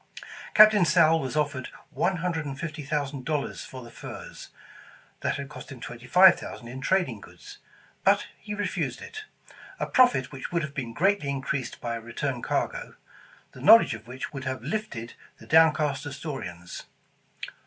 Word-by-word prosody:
Captain 215 -2 +8
Sowle 165 0 +5
was 135 -1 -4
offered 145 -3 -1 0.2
one 175 +8 0
hundred 165 -2 -2
and 140 -2 -6
fifty 155 -2 -5
thousand 140 -2 -3
dollars 150 0 -2
for 130 -1 -9
the 120 - -12
furs, - - -9 0.7
that - - -1
had 140 -1 -5
cost 150 - -11
him 130 - -9
twenty 120 +1 -9
five 185 +4 +7
thousand 120 - -8
in 130 +3 -7
trading 135 - 0
goods, - - -13 0.4
but - - +4 0.2
refused 205 0 -2
it; 435 0 -9 0.5
a - - 0
profit 245 - +3
which 135 -2 -7
would 170 -2 0
have 145 -2 -5
been 125 -4 -4
greatly 190 - +1
increased 135 -2 -3
by 120 -1 -3
a 115 - -6
return 120 +2 -3
cargo, - - -2 0.6
the 130 - -13
knowledge 220 - +7
of 110 +1 -9
which 130 +4 -7
would 135 -2 -6
have 130 0 -3
lifted 210 - -4 0.2
the - - -14
downcast 150 -3 +4
Astorians. 130 - -7
140 Hz, 165 wpm, -27 LUFS, 130-170 Hz, 0.7 s, Captain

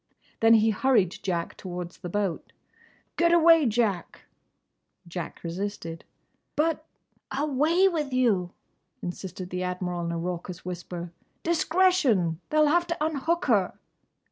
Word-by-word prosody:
Then 225 0 +6
he 220 0 +4
hurried 210 -6 +2
Jack 175 -4 -2
towards 180 -2 -7
the 175 - -6
boat. 195 -2 -2 0.6
"Get 340 0 +4
away, 330 -3 +6
Jack!" 215 -5 -1 0.9
Jack 170 -1 -6
resisted. 170 -1 -5 0.5
"But—!" 315 0 +1 0.5
"Away 305 +6 +2
with 310 -7 -1
you!" 225 -9 +2 0.5
insisted 180 0 -6
the 180 0 -2
Admiral 180 -1 -3
in 170 - -2
a 170 - -2
raucous 175 +1 -5
whisper. 175 -1 -6 0.3
"Discretion!—They'll 310 - +2
have 345 +3 +3
to 335 - -2
unhook 320 +3 0
her!" 205 -8 +2
205 Hz, 115 wpm, -27 LUFS, -, 0.9 s, Then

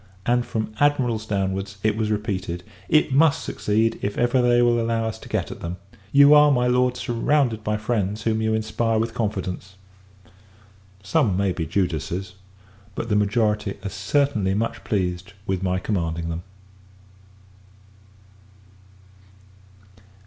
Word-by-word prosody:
and, 120 0 +1
from 110 -1 -3
Admirals 125 -7 +1
downwards, 95 -1 -2
it 110 -1 +2
was 110 -1 -1
repeated 95 -4 -3 0.3
"It 155 -3 +3
must 145 +1 +4
succeed, 110 +2 0
if 100 0 -3
ever 120 +1 +2
they 120 0 +4
will 120 -1 +3
allow 115 0 0
us 110 - -4
to - - -12
get - - -2
at - - -8
them! 85 +2 -5 0.3
You 140 +1 +7
are, 150 0 +7
my 125 -2 +2
Lord, 125 0 +2
surrounded 120 -1 0
by 105 0 0
friends 105 -1 -2
whom 110 -1 0
you 110 0 +1
inspire 110 +1 0
with 115 +1 -1
confidence." 95 -4 -3 1.3
Some 100 - +1
may 100 -1 +1
be 80 -3 -3
Judas's; 90 +1 -2 0.6
but 115 - -4
the 105 - +2
majority 105 -1 +1
are - - -1
certainly 95 +1 0
much 115 +2 -2
pleased 95 -1 -2
with 95 -3 -1
my 90 -1 0
commanding 85 -4 -2
them. 85 +1 -4
110 Hz, 140 wpm, -23 LUFS, 95-120 Hz, 1.3 s, You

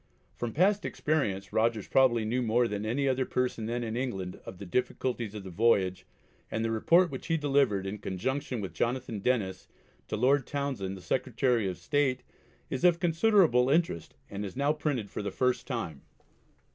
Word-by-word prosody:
From 120 -1 -3
past 195 - +3
experience 105 -11 -1
Rogers 110 -1 +1
probably 120 -4 +3
knew 120 +4 0
more 120 +1 +2
than 105 0 -3
any 135 +5 0
other 130 0 +2
person 125 -3 -1
then 120 +1 -2
in 115 -1 -3
England 95 -8 -3
of 95 - -8
the 100 - -8
difficulties 120 +2 -2
of 105 - -6
the 95 - -8
voyage 95 -2 +2 0.4
and 110 +1 -1
the 115 - 0
report 170 +10 +4
which 130 - -6
he 165 -2 +2
delivered, 135 -10 +2
in 100 +2 -4
conjunction 125 +6 -3
with 95 - -5
Jonathan 120 -3 -2
Denniss, 105 -5 -1 0.4
to - - -3
Lord 130 +3 +3
Townshend 130 -10 -3
the - - -11
Secretary 120 -1 0
of 90 -2 -3
State, 130 +8 0 0.4
is 130 - -4
of 175 -1 +5
considerable 165 - +4
interest 155 - 0
and 100 +1 -5
is 95 -3 -6
now 140 +3 +2
printed 145 -9 -2
for - - -4
the 100 - -2
first 125 -1 0
time. 100 - -4
120 Hz, 180 wpm, -29 LUFS, 105-140 Hz, 0.4 s, of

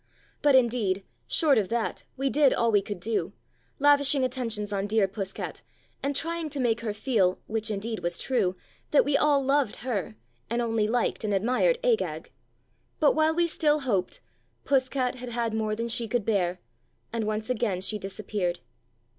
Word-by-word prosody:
But 290 -2 +5
indeed, 230 -6 +2 0.2
short 280 - +3
of 195 - -2
that, 235 -1 -2
we 270 +1 0
did 290 -2 +4
all 235 -1 +2
we 205 -2 +4
could 200 -1 -6
do, 205 -3 -2 0.4
lavishing 285 -1 +4
attentions 230 -5 -2
on 200 0 -1
dear 210 -1 +2
Puss 195 0 -5
cat, - - -6 0.4
and 280 +1 -1
trying 330 +2 -1
to 285 - -4
make 235 -3 +1
her 225 -2 -2
feel 205 -4 +1
(which 220 0 -2
indeed 215 +2 -3
was 175 0 -2
true) 190 -9 0 0.3
that 295 - +4
we 285 0 +1
all 285 -1 +3
loved 275 -4 +2
her, 200 - -2 0.3
and 235 +2 0
only 225 -3 +1
liked 235 0 0
and 210 -2 0
admired 255 - +2
Agag. 485 -2 0 0.7
But 300 - +5
while 315 +1 +2
we 345 0 +3
still 305 -2 +1
hoped, 200 -9 -1 0.4
Puss 260 -2 +2
cat 255 -2 0
had 250 0 -7
had 235 -1 -1
more 215 -1 -1
than 230 +2 -3
she 235 0 -1
could 225 -1 -1
bear, 185 -4 0 0.5
and 225 -2 -1
once 215 +3 -2
again 215 -6 0
she 210 +3 -2
disappeared. 195 -2 -3
230 Hz, 180 wpm, -27 LUFS, 205-275 Hz, 0.7 s, But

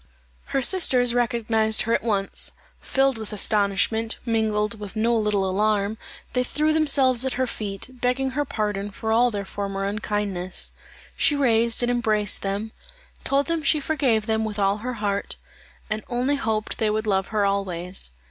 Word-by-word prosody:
Her 270 - 0
sisters 250 -8 +4
recognized 230 -2 +2
her 230 - 0
at - - +2
once. 200 -4 0 0.3
Filled 270 -3 +1
with 220 - -6
astonishment, 210 +2 +1
mingled 220 -1 0
with 205 0 -8
no 230 +2 +2
little 210 -3 +1
alarm, 210 +2 0 0.3
they 250 0 +2
threw 305 +4 +1
themselves 275 -5 +4
at 265 - -1
her 260 - 0
feet, 200 -5 -5 0.2
begging 260 +2 0
her 290 +3 0
pardon 210 -5 -2
for 220 +2 -4
all 240 +2 +4
their 205 -3 -4
former 195 0 -4
unkindness. 200 -3 -2 0.4
She 295 - +3
raised 235 -4 +3
and 240 - +2
embraced 215 -4 +1
them: 200 +3 -3 0.5
told 275 +1 +1
them 330 +2 -1
she 300 +1 +3
forgave 270 -8 +1
them 220 0 0
with 215 -1 -4
all 200 0 +2
her 250 +4 -4
heart, 205 -2 -2 0.5
and 215 0 -3
only 250 +4 +1
hoped 220 -5 -2
they 220 - +2
would 215 +1 -1
love 195 -2 +1
her 210 -2 0
always. 185 - -3
220 Hz, 165 wpm, -24 LUFS, 205-245 Hz, 0.5 s, sisters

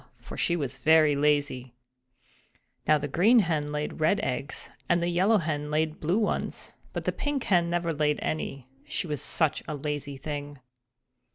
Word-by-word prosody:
for - - -9
she 170 - +1
was 145 -6 -3
very 155 -2 +5
lazy. 140 -4 0 1.1
Now 155 - +6
the 145 0 -3
Green 200 - +4
Hen 155 -5 -1
laid 150 +2 -3
red 165 +6 +3
eggs 135 +3 -3 0.2
and 175 -1 +4
the 170 0 0
Yellow 190 +6 +3
Hen 150 -4 -2
laid 155 +1 0
blue 170 +6 +1
ones; 220 -2 -2 0.2
but - - -5
the - - +2
Pink 290 -3 -2
Hen 175 -3 +2
never 170 -1 0
laid 150 0 +1
any, 140 -4 -3 0.2
she - - -2
was 150 -4 -3
such 160 -4 +1
a 155 - -3
lazy 145 -1 -4
thing. 145 0 -5
155 Hz, 170 wpm, -27 LUFS, 145-170 Hz, 1.1 s, Now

